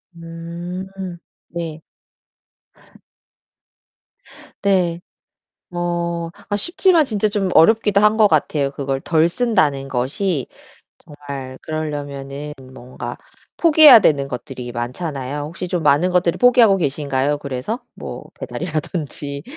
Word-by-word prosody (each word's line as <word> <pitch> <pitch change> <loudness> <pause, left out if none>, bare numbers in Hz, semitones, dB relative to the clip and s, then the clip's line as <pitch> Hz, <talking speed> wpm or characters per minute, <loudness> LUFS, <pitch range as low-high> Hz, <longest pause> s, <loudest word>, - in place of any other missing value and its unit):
음 170 +2 -7 0.6
네. 165 -2 -5 2.8
네. 180 -3 +2 0.7
뭐 170 -1 -2 0.2
아 205 - 0
쉽지만 345 - +3
진짜 215 -3 0
좀 200 -3 -1
어렵기도 210 +2 +5
한 210 +1 +4
것 215 -2 +6
같아요. 145 -3 +1
그걸 135 -1 -3
덜 165 0 +2
쓴다는 150 - +1
것이 135 +5 -1 0.9
정말 130 -1 -7
그러려면은 145 -2 -5 0.2
뭔가 125 0 -7 0.4
포기해야 305 -7 +8
되는 140 -6 +2
것들이 125 -1 -6
많잖아요. 135 +3 -4
혹시 170 +4 -6
좀 175 -2 -2
많은 150 +5 +3
것들을 180 -1 +2
포기하고 240 -5 +6
계신가요, 145 -2 -1
그래서? 140 - -4
뭐 - - -8
배달이라든지. 150 -3 -4
165 Hz, 235 characters per minute, -20 LUFS, 140-190 Hz, 2.8 s, 포기해야